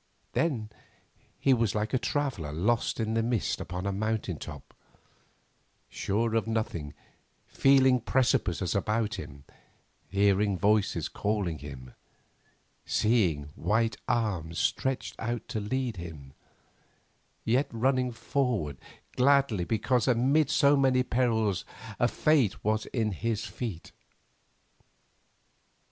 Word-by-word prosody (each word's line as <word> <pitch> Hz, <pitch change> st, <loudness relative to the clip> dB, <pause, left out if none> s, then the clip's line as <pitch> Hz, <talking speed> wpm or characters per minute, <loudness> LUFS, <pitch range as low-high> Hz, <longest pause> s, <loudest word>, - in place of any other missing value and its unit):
Then 120 Hz, -10 st, 0 dB, 0.7 s
he 135 Hz, -, +4 dB
was 115 Hz, -4 st, +1 dB
like 105 Hz, +3 st, -1 dB
a 130 Hz, -, +3 dB
traveller 115 Hz, -, -2 dB
lost 105 Hz, +13 st, 0 dB
in 110 Hz, 0 st, -1 dB
the 115 Hz, -, +2 dB
mist 115 Hz, -2 st, -1 dB
upon 90 Hz, +2 st, -5 dB
a 100 Hz, -, 0 dB
mountain 105 Hz, -4 st, -2 dB
top, 75 Hz, -3 st, -9 dB, 1.2 s
sure 110 Hz, +3 st, -1 dB
of 115 Hz, -1 st, +1 dB
nothing, 110 Hz, -10 st, -3 dB, 0.5 s
feeling 130 Hz, -2 st, +4 dB
precipices 105 Hz, -7 st, +1 dB
about 105 Hz, +1 st, 0 dB
him, 70 Hz, -6 st, -9 dB, 0.7 s
hearing 100 Hz, 0 st, +2 dB
voices 105 Hz, +1 st, +2 dB
calling 100 Hz, -7 st, -2 dB
him, 65 Hz, -3 st, -10 dB, 0.9 s
seeing 90 Hz, -11 st, +1 dB
white 115 Hz, +1 st, +1 dB
arms 95 Hz, -9 st, -1 dB
stretched 130 Hz, -1 st, -1 dB
out 120 Hz, +1 st, -3 dB
to 120 Hz, -3 st, -2 dB
lead 120 Hz, +1 st, -2 dB
him, 75 Hz, -6 st, -9 dB, 1.1 s
yet 130 Hz, +5 st, +2 dB
running 125 Hz, +2 st, +1 dB
forward 115 Hz, -, -1 dB, 0.4 s
gladly 130 Hz, -8 st, +3 dB
because 115 Hz, +4 st, +1 dB
amid 135 Hz, +4 st, +3 dB
so 145 Hz, -2 st, +4 dB
many 130 Hz, -2 st, +3 dB
perils 110 Hz, -6 st, +1 dB, 0.4 s
a -, -, +4 dB
fate 145 Hz, -10 st, +2 dB
was 110 Hz, +1 st, 0 dB
in 110 Hz, -4 st, -1 dB
his 110 Hz, +3 st, -2 dB
feet. 105 Hz, -10 st, -6 dB
110 Hz, 110 wpm, -29 LUFS, 95-125 Hz, 1.2 s, he